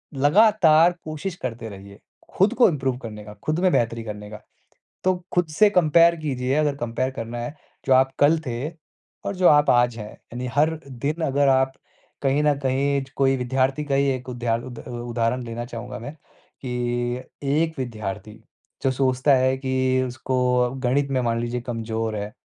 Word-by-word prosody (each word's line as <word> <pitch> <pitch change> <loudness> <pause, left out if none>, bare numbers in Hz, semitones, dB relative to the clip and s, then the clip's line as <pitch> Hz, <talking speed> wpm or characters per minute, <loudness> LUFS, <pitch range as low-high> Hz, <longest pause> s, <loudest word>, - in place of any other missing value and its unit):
लगातार 170 +2 +5
कोशिश 155 +4 -5
करते 115 -2 -4
रहिए, 100 0 -12 0.4
खुद 200 +5 +4
को 250 - +7
इम्प्रूव 135 -5 -1
करने 110 -4 -8
का, 105 0 -10
खुद 155 +2 0
में 185 0 +3
बेहतरी 115 -3 0
करने 105 -1 -7
का। 105 0 -9 0.6
तो 185 0 +3 0.2
खुद 175 -2 +2
से 205 +7 +4
कंपेयर 170 -2 +5
कीजिए 130 -3 -1
अगर 150 -2 +1
कंपेयर 120 +1 -2
करना 115 -2 -6
है। 120 +6 -5 0.3
जो 135 - +4
आप 130 +1 +4
कल 150 +3 +5
थे 125 +5 -3 0.6
और - - -2
जो 180 -1 +4
आप 145 0 +5
आज 120 -1 +3
हैं, 105 -1 -7
यानी 125 +2 -8
हर 155 +2 +2
दिन 140 +5 -3
अगर 140 0 +2
आप 130 0 +3 0.5
कहीं 140 +2 +2
न 150 -1 +4
कहीं 140 +2 +1
ज 135 - -15
कोई 135 -1 +3
विद्यार्थी 130 +3 0
का 140 -2 0
ही 140 +1 +2
एक 130 -1 -5
उदाह 120 -2 -1
उद 120 -2 -9
उ - - -7 0.2
उदाहरण 120 +2 0
देना 115 0 -5
चाहूँगा 115 -4 -7
मैं 140 +6 -7
कि 140 -3 -13 0.7
एक 155 +4 +1
विद्यार्थी, 110 -4 -5 0.5
जो 135 - +3
सोचता 130 +1 +2
है 130 0 +2
कि 130 -1 +1
उसको 130 +1 -4 0.2
अ, 125 0 +2
गणित 135 +2 +1
में 130 -1 +1
मान 115 -1 0
लीजिए 120 +1 -3
कमज़ोर 115 -2 -3
है, 105 0 -5
130 Hz, 180 wpm, -23 LUFS, 120-145 Hz, 0.7 s, को